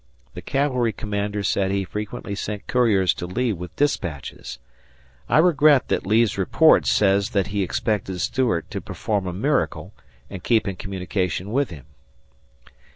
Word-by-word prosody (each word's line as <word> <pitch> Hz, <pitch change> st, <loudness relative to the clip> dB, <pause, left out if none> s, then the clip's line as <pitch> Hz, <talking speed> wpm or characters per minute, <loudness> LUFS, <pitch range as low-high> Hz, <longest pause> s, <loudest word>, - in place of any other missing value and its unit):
The -, -, -8 dB
cavalry 125 Hz, -5 st, 0 dB
commander 105 Hz, 0 st, -3 dB
said 95 Hz, -1 st, +1 dB
he 100 Hz, 0 st, 0 dB
frequently 105 Hz, 0 st, -5 dB
sent 105 Hz, +1 st, -5 dB
couriers 110 Hz, -7 st, +2 dB
to 90 Hz, -, -6 dB
Lee 115 Hz, +5 st, -1 dB
with 90 Hz, -1 st, -8 dB
dispatches. 85 Hz, -, -3 dB, 0.7 s
I -, -, +4 dB
regret 155 Hz, -4 st, +4 dB
that -, -, -1 dB
Lee's 110 Hz, -1 st, +2 dB
report 155 Hz, -, +4 dB
says 100 Hz, -1 st, +3 dB
that 100 Hz, -, +2 dB
he 100 Hz, -, 0 dB
expected 95 Hz, -1 st, -2 dB
Stuart 115 Hz, -3 st, -1 dB
to -, -, -4 dB
perform 105 Hz, -4 st, -3 dB
a -, -, -2 dB
miracle 135 Hz, +11 st, -1 dB, 0.3 s
and 95 Hz, -2 st, -9 dB
keep 110 Hz, -3 st, +2 dB
in 95 Hz, -, -2 dB
communication 95 Hz, 0 st, -3 dB
with 140 Hz, +3 st, +1 dB
him. 75 Hz, -6 st, -11 dB
100 Hz, 150 wpm, -23 LUFS, 95-120 Hz, 0.7 s, I